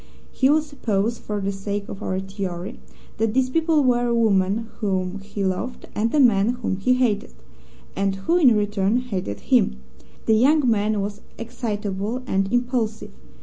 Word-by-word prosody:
We 260 - +6
will 305 +1 +4
suppose 230 -6 -1
for 210 -1 -4
the 200 0 -1
sake 200 +1 -4
of 195 - -8
our 185 0 -2
theory 190 +1 -5 0.4
that 225 0 0
these 260 -1 +2
people 320 0 +2
were 245 -1 +2
a 235 - +1
woman 215 -1 +2
whom 190 -3 -1
he 200 0 -4
loved 210 +7 -3
and 225 +2 0
a - - +4
man 230 -3 +4
whom 190 - -1
he 225 +6 +2
hated 220 - 0 0.6
and 195 0 0
who 260 - +1
in 250 -9 +6
return 205 +1 +1
hated 190 - -4
him. 65 - +2 0.5
The 220 - +4
young 270 +5 +4
man 215 -2 +1
was 205 +1 -5 0.2
excitable 220 -1 -3
and 195 -3 0
impulsive. 245 -3 -1
210 Hz, 165 wpm, -23 LUFS, 195-245 Hz, 0.6 s, We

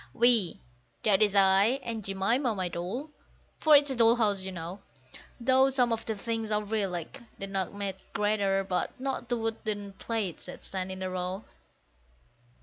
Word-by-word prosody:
We 235 -6 +3 0.4
that 210 -2 +4
is 205 -1 +4
I 200 +6 +5
and 225 -2 -4
Jemima, 215 +6 +1
my 185 -2 -1
doll. 200 - -5 0.5
(For 310 -1 +6
it's 285 -1 +5
a - - -1
Doll's 230 0 +5
House, 205 -4 +2
you 190 0 -3
know, 175 +2 -6 0.6
Though 260 +2 +4
some 250 -3 +2
of 225 - -4
the 220 - -1
things 225 +1 -3
are 210 0 +1
real, 210 -2 -1
like 175 +2 -6 0.2
the 195 - -4
nutmeg 195 0 -3
grater, 200 -2 +1
but 180 +5 -2
not 260 -2 -3
the 240 - 0
wooden 215 -3 -3
plates 205 -3 -4
that - - -10
stand 190 -1 -4
in 190 0 -6
a 185 - -2
row. 185 +3 -3
210 Hz, 170 wpm, -29 LUFS, 190-235 Hz, 0.6 s, For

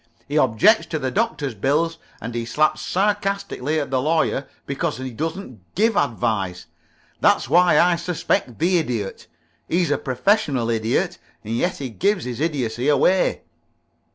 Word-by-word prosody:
He - - -4
objects 210 - +4
to 160 - -2
the 130 -3 -2
Doctor's 190 - -1
bill 145 +10 +1 0.3
and 115 +2 -6
he 120 0 -2
slaps 155 +6 +1
sarcastically 200 -7 -1
at 145 - -4
the 130 -1 +1
Lawyer 155 -2 0 0.2
because 145 +3 -2
he 130 0 -5
doesn't 160 - -5 0.2
give 220 +1 +2
advice. 110 - -1 0.5
That's - - +3
why 180 +1 +5
I 175 -1 +4
suspect 170 -8 -1
the 175 +2 +2
Idiot. 115 -10 -4 0.4
He's 175 +1 +1
a - - +1
professional 130 - +1
Idiot, 115 0 0 0.2
and 110 +2 -3
yet 175 +10 0
he 135 -3 -5
gives 195 - 0
his 125 -1 -5
idiocy 130 -6 -1
away." 150 +6 +2
145 Hz, 150 wpm, -22 LUFS, 120-180 Hz, 0.5 s, why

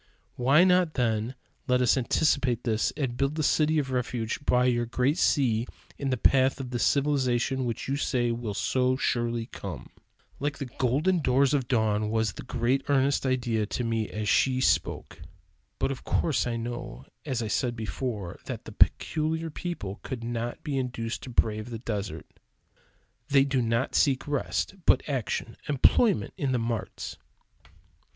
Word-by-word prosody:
"Why 135 +7 +5
not, 180 -3 +3
then, 115 0 0 0.3
let 125 0 +3
us 125 -2 +4
anticipate 130 -2 +1
this 110 -2 +1
and 130 -5 -2
build 140 +3 0
the 155 - -1
city 155 +2 +3
of 135 -3 -1
refuge 125 -1 -2
by 125 -2 +3
your 120 -1 +1
great 125 +6 +1
sea 120 -5 +2 0.3
in 140 - -1
the 130 - 0
path 130 +3 +3
of 130 -2 -6
this 120 -4 0
civilization 130 -2 +1
which 115 -2 -3
you 135 - 0
say 125 -4 0
will 115 -3 -4
so 130 +4 +1
surely 120 -2 -1
come?" - - -8 0.5
Like 145 +1 -2
the 140 - -4
golden 140 +9 +1
doors 135 -1 +3
of 135 -4 0
dawn 110 -3 +1
was 110 -3 0
the - - -8
great 125 +2 0
earnest 135 0 +2
idea 120 -4 0
to 125 - -3
me 115 -2 -1
as 105 0 -4
she 130 +4 +3
spoke. - - 0 0.6
But - - 0
of 135 - -6
course 150 -6 +1
I 120 - -1
know, 120 +2 -6 0.2
as 130 -5 -2
I - - -3
said 120 +2 0
before, 110 -4 -4
that - - -6
the - - -8
"peculiar 160 +1 +1
people" 120 - -5
could 125 -3 -6
not 120 0 -4
be 140 -4 -1
induced 120 -3 -3
to - - -8
brave 110 -1 0
the 115 - -5
desert. 100 -8 -4 1.0
They 140 -1 +5
do 135 -2 +1
not 115 +3 0
seek 135 -2 +2
rest, 145 +5 -1
but - - +4
action 125 -4 -3
employment 190 - +3
in 140 -7 0
the - - +2
marts. 115 -2 -4
125 Hz, 165 wpm, -27 LUFS, 115-140 Hz, 1.0 s, Why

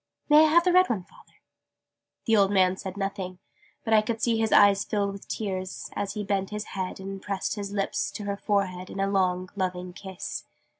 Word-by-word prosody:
May 300 +1 +8
I - - +5
have 340 +2 +5
the 360 0 +2
red 365 0 +5
one, 205 -6 -1
Father?" 185 - -21 0.9
The 225 - +4
old 200 -2 +4
man 190 -2 +3
said 190 0 -7
nothing: 195 -2 -3 0.5
but 220 - 0
I 215 - +7
could 225 +1 -3
see 230 0 +2
his 225 -1 +1
eyes 200 0 +6
fill 205 -1 -1
with 200 0 -10
tears, 185 -3 -4
as 200 -1 -2
he 210 -1 -3
bent 195 -1 -1
his 210 0 -4
head 190 -1 -4
and 195 0 -6
pressed 195 -1 -2
his 200 -1 -5
lips 200 -1 -1
to 210 - -6
her 200 0 -2
forehead 190 -3 -1
in - - -7
a 195 - +2
long 185 -2 0
loving 180 -2 -3
kiss. 190 0 -6
195 Hz, 210 wpm, -27 LUFS, 190-210 Hz, 0.9 s, May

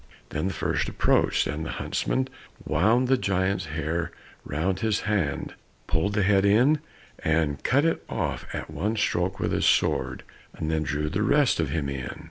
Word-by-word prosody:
Then 75 +5 -2
the 95 - -2
first - - -1
approached, - - +2
and 80 +2 -3
the - - -4
huntsman 130 0 -1 0.4
wound 115 +8 +3
the 130 0 +3
giant's 95 -2 0
hair 80 +2 -2 0.3
round 90 +6 -1
his 110 -2 +1
hand, 95 -10 -1 0.3
pulled 80 +6 0
the 105 -1 +2
head 100 0 +4
in, 120 +10 +4 0.4
and 80 -3 +1
cut 140 +4 +3
it 165 - 0
off - - -2
at - - -5
one 100 +9 -1
stroke 95 -2 0
with - - 0
his - - +2
sword, - - +1 0.3
and 80 - -2
then 80 -1 +1
drew 75 0 -1
the 95 +6 -1
rest 140 +1 +3
of 80 -4 0
him 70 0 -1
in. 70 -2 -5
95 Hz, 175 wpm, -26 LUFS, 80-105 Hz, 0.4 s, head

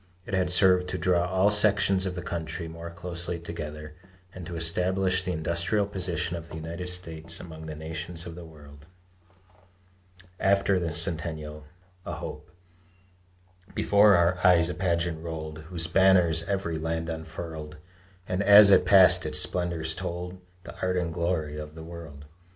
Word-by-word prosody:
It - - -9
had 95 -1 +1
served 90 0 +4
to 90 - -3
draw 90 0 +1
all 95 +3 +2
sections 100 -2 +2
of 90 - -4
the 90 - -6
country 85 0 -5
more 85 +1 -8
closely 85 0 -3
together, 75 -2 -8 0.4
and 90 -3 -9
to 90 - -6
establish 90 +3 +1
the 90 0 -3
industrial 85 +5 0
position 90 -3 -2
of 85 -1 -8
the 85 - -9
United 85 +3 -6
States 80 -2 -3
among 80 -2 -10
the 80 - -6
nations 80 +2 -5
of 85 - -8
the 85 +1 -10
world. 75 -2 -15 1.5
AFTER 100 0 +2
THE 85 -2 -3
CENTENNIAL 80 -3 -1 0.4
(A - - -4
HOPE) - - -8 1.3
Before 100 0 +5
our 85 +1 +2
eyes 90 -2 +5
a - - -4
pageant 85 -3 -1
rolled 80 -2 -6
Whose 85 -3 -1
banners 90 -2 +4
every 95 -5 -2
land 80 +1 -3
unfurled; 80 -1 -7 0.5
And 90 +2 -1
as 100 0 +8
it 90 -2 +5
passed, 95 0 +6
its - - 0
splendors 85 -3 0
told 90 0 -6 0.2
The - - -10
art 90 0 0
and 85 -2 -2
glory 80 -3 -2
of 75 0 -9
the 80 - -9
world. 80 -4 -10
85 Hz, 155 wpm, -27 LUFS, 80-90 Hz, 1.5 s, as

